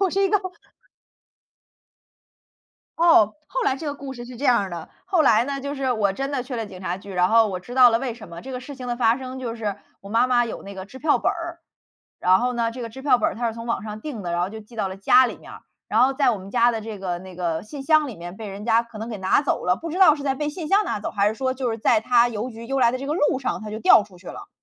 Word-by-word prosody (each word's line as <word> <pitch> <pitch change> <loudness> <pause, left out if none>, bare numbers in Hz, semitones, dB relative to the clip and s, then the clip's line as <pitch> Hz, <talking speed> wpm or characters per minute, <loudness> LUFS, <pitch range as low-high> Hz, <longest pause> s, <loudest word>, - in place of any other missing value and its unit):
我 385 -2 +2
是 395 +2 +1
一 390 - +3
个 415 - +3 2.6
哦， 325 -11 +5
后 - - -2
来 270 - +1
这 310 - -7
个 290 - -2
故 275 -2 -8
事 240 - -8
是 245 0 -10
这 280 - -6
样 245 -2 +5
儿 195 - -5
的。 170 -2 -7 0.2
后 375 -3 +1
来 230 -5 +4
呢， 275 +1 -4
就 280 +1 -4
是 270 -3 0
我 205 -4 +1
真 275 +5 -3
的 270 -3 -1
去 250 -1 -6
了 225 - -2
警 190 -3 -11
察 180 -1 -3
局， 195 +1 -10
然 180 0 +2
后 225 0 +5
我 185 -3 -4
知 240 +7 -10
道 255 -2 +8
了 230 - +2
为 250 -3 -3
什 225 -5 -12
么， 170 0 -9
这 265 - -9
个 250 - -3
事 280 +3 -9
情 255 -2 -7
的 240 - -2
发 235 0 +3
生 260 0 -7
就 240 -3 -4
是 210 -4 -3 0.2
我 200 - -12
妈 230 +4 +3
妈 240 -1 +2
有 225 - -6
那 200 0 -9
个 190 0 -8
支 260 +6 -12
票 300 +1 +2
本 - - +1
儿， 335 0 -6 0.6
然 185 +1 +4
后 250 +1 0
呢， 230 -1 0
这 250 - -8
个 235 - -4
支 265 +4 -11
票 270 -3 +4
本 - - +2
儿 - - -7
她 235 0 -1
是 225 - -5
从 230 0 -8
网 230 -4 -1
上 215 0 -7
订 240 -5 -6
的， 175 -2 -3
然 175 - 0
后 180 - 0
就 220 +1 -8
寄 220 +2 -16
到 205 -3 -1
了 190 - -7
家 255 +6 +5
里 - - -6
面 - - -13
儿， - - -11 0.3
然 220 - +2
后 265 +2 +3
在 270 -2 +3
我 220 - -2
们 190 +1 -10
家 240 +2 +4
的 225 - -3
这 215 -1 -7
个 180 -2 -3
那 185 0 -12
个 170 -3 -2
信 270 +6 -8
箱 310 0 +3
里 235 - -8
面 175 +2 -8
被 215 -1 -7
人 200 +2 -8
家 230 0 +3
可 235 -1 -14
能 220 +2 -6
给 215 - -5
拿 190 +8 +2
走 290 - -1
了， 180 0 +3
不 330 - -6
知 355 - -4
道 340 -6 +7
是 295 - -7
在 270 -1 0
被 295 +2 -2
信 320 +1 -5
箱 400 +6 +4
拿 - - -2
走， - - -4
还 205 0 +2
是 220 - -3
说 260 +2 -1
就 255 -2 -2
是 225 - -2
在 220 0 +3
它 240 +1 +4
邮 225 +2 -4
局 230 -1 -10
邮 270 +2 -1
来 235 - +5
的 - - -1
这 275 - -6
个 295 - -1
路 295 -4 +1
上 260 - -3
它 215 - -7
就 215 - -5
掉 215 -1 +6
出 195 -3 -18
去 180 - -18
了。 - - -9
235 Hz, 340 characters per minute, -23 LUFS, 210-270 Hz, 2.6 s, 道